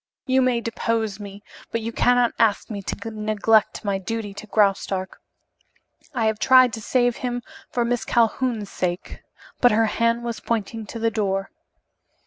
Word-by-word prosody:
You 260 -1 +3
may 250 -2 +2
depose 225 -2 -2
me, 200 0 -9 0.3
but 230 - -1
you 230 +1 -3
cannot 245 +1 +3
ask 220 -1 +2
me 200 -2 -4
to 225 +3 -5
neglect 215 0 +1
my 195 -1 0
duty 210 +1 -4
to 215 - -9
Graustark. 195 -2 0 0.9
I 230 -3 +1
have 220 -1 0
tried 255 -2 +6
to 225 - -5
save 245 +1 +1
him 245 -1 -3 0.3
for 240 -1 0
Miss 245 0 0
Calhoun's 230 -2 0
sake 180 0 -3 0.2
" - - -23
But 245 - +6
her 225 +1 +4
hand 230 +2 +1
was 235 -1 -4
pointing 225 -1 -3
to 230 - -7
the 230 0 0
door. 195 -3 -1
225 Hz, 165 wpm, -23 LUFS, 205-235 Hz, 0.9 s, tried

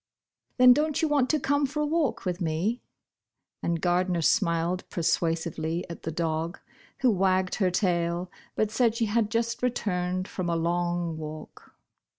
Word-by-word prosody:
"Then 250 0 +8
dont 305 +3 0
you - - +4
want 285 -4 +2
to 310 - +2
come 285 +1 +1
for 300 +3 -4
a 300 - +2
walk 305 -7 0
with 180 0 -2
me?" 175 +9 -1 0.8
and 170 -1 -1
Gardner 175 0 +1
smiled 175 -2 +1
persuasively 165 0 -1
at 170 - -8
the 160 - -4
dog, 165 +1 -2 0.4
who 255 -2 +5
wagged 185 -1 +1
her 190 -3 +2
tail 175 -1 0 0.2
but 215 -1 0
said 230 -1 +2
she 230 -1 +1
had 215 0 +1
just 230 +1 -1
returned 185 -6 -1
from 180 -2 -3
a 170 - +1
long 175 0 -1
walk. 155 0 -9
185 Hz, 160 wpm, -27 LUFS, 170-235 Hz, 0.8 s, Then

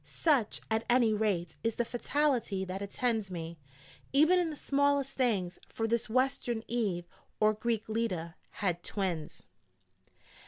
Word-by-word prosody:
Such, 280 -10 +1
at 220 0 +2
any 240 -3 +5
rate, 195 -6 0
is 230 -1 0
the 240 - 0
fatality 240 -6 0
that 190 +1 -5
attends 220 0 -1
me, 165 -2 -6 0.5
even 315 +6 +5
in 345 -2 +1
the 305 - -5
smallest 280 -1 +1
things: 200 -9 0
for 225 - -2
this 235 0 0
Western 245 -2 +1
Eve, 200 -8 -1 0.3
or 215 0 +5
Greek 220 0 -1
Leda, 215 -7 -2 0.2
had 180 -3 -1
twins. 180 -6 -3
220 Hz, 140 wpm, -31 LUFS, 190-250 Hz, 0.5 s, any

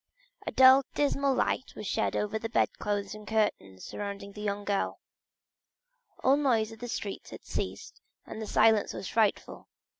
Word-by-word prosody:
A - - -1
dull 260 0 +8
and 275 - -5
dismal 280 -2 +1
light 260 - -1
was 210 - -7
shed - - 0
over 210 +1 -1
the 225 - -4
bedclothes 205 -3 -1
and 215 0 -11
curtains 150 - -1
surrounding 200 -1 -6
the 210 - -9
young 205 -1 -2
girl. 200 -1 -1 1.2
All 270 +2 +5
noise 230 -7 +2
in 225 - -11
the 245 - -6
streets 205 -3 -5
had - - -10
ceased, - - -5 0.2
and 220 - -7
the 215 - -5
silence 220 0 +3
was - - -6
frightful. 220 -3 0
215 Hz, 170 wpm, -29 LUFS, 205-245 Hz, 1.2 s, dull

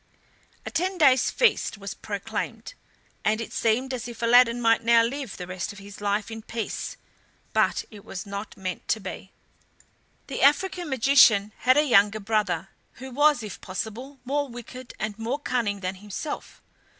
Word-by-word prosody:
A - - -5
ten 370 +3 -1
days' 265 -6 +5
feast 475 - +2
was 200 -1 -6
proclaimed, 200 - -5 0.5
and 215 +1 +2
it 230 - -6
seemed 245 +4 +1
as 245 -1 -4
if 235 -1 -8
Aladdin 240 0 +5
might 230 -1 +3
now 230 0 +5
live 260 -1 -4
the 180 - -6
rest 185 +1 -4
of 205 - -12
his 200 +1 -11
life 205 +1 -1
in 225 0 -6
peace; 225 0 -4 0.6
but - - +2
it 205 -2 -12
was 195 -2 -7
not 200 +1 -6
meant 185 -2 -5
to 220 - +1
be. 195 -1 -8 0.9
The 275 - -5
African 345 +4 +3
magician 230 -6 +5
had 255 +2 +4
a 300 - +6
younger 215 -5 +4
brother, 200 -4 -1 0.2
who 265 +2 -9
was, 290 -1 +3
if 210 - -8
possible, 225 +9 -6
more 285 +2 -1
wicked 245 +1 -10
and 215 0 -4
more 235 +5 -1
cunning 235 -8 -1
than 185 0 -2
himself. 210 +9 -7
230 Hz, 165 wpm, -26 LUFS, 205-260 Hz, 0.9 s, a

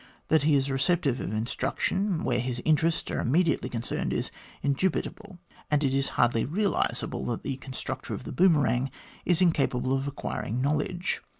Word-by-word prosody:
That 160 -1 +5
he 150 +1 +4
is 135 0 +1
receptive 140 -2 +1
of - - -3
instruction 140 - -1
where 120 - +1
his 125 0 -2
interests 160 +1 +2
are - - -1
immediately 160 +5 +2
con 115 -1 -3
cerned, - - -2
is - - -2 0.3
indubitable; 185 +6 -1 0.3
and 150 0 +2
it 135 -1 +2
is 135 0 +1
hardly 120 -2 +3
realisable 195 - 0
that 120 - -3
the 135 - -3
constructor 130 0 -5
of - - -8
the - - -6
boomerang 140 -8 +3 0.4
is 180 0 +3
incapable 135 -6 +2
of 135 +1 -2
acquiring 125 -4 -3
knowledge. 155 +6 0
140 Hz, 165 wpm, -28 LUFS, 130-170 Hz, 0.4 s, That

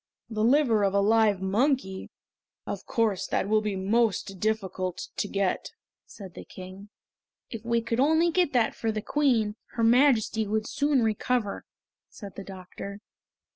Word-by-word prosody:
"The 215 -1 -1
liver 245 -3 +4
of 195 0 +1
a - - +4
live 210 -2 +3
monkey! 200 -1 0 0.6
Of - - -6
course 215 -6 0
that - - -1
will 215 +1 +3
be 210 -2 -2
most 195 -1 0
difficult 190 -4 -2
to - - -2
get," 195 -2 -2 0.3
said 190 -5 -11
the - - -9
King. 190 +2 -11 0.6
"If 225 -2 -6
we 235 0 +1
could 230 +1 -2
only 320 +5 +3
get 355 -3 +2
that 235 -3 +2
for 225 - -2
the 215 -1 -4
Queen, 235 -8 +1 0.2
her 230 - -1
Majesty 230 -3 +3
would 215 +1 -1
soon 285 -3 +1
recover," 220 0 -1 0.4
said 200 -4 -10
the 195 - -7
doctor. 195 +1 -9
220 Hz, 155 wpm, -27 LUFS, 195-240 Hz, 0.6 s, liver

